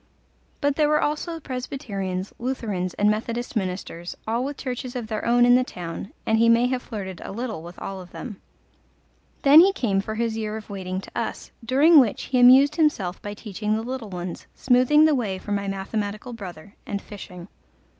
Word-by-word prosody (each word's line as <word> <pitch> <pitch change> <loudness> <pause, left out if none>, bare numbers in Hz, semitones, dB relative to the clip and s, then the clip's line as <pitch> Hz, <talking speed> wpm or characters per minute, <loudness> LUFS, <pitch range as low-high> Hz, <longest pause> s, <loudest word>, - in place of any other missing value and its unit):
But 285 -1 +1
there 300 -1 +3
were 300 0 +3
also 315 +3 -2
Presbyterians, 210 -9 -4
Lutherans, 215 -8 -3
and 205 - +2
Methodist 230 +4 -1
ministers, 180 -3 -4
all 230 +3 0
with 285 +1 -4
churches 255 -1 -5
of 245 -2 -3
their 215 -1 -4
own 240 +1 +5
in 245 - +6
the 255 +1 +5
town, 175 -4 -7
and 220 0 +2
he 230 0 +5
may 230 +1 +5
have 255 -1 -1
flirted 190 -7 -7
a - - -7
little 225 -4 -4
with 175 +2 -11
all 195 -1 -6
of 180 - -12
them. 210 -1 -8 1.0
Then 285 +3 +9
he 380 +4 +7
came 205 - 0
for 220 +2 -5
his 230 0 -1
year 215 -1 -3
of 215 -2 -10
waiting 185 -1 -4
to - - -12
us, - - -4
during 290 +7 +6
which 235 -7 +2
he 255 - 0
amused 265 +4 +7
himself 205 - +1
by 205 0 -6
teaching 210 0 -3
the 220 - -2
little 245 -3 -5
ones, 180 -1 -6
smoothing 260 +5 +4
the 310 - +4
way 215 -8 -1
for 205 - -8
my 200 -1 -1
mathematical 205 +4 -4
brother, 195 -3 -9
and 200 - -2
fishing. 180 -4 -10
220 Hz, 195 wpm, -24 LUFS, 195-255 Hz, 1.0 s, Then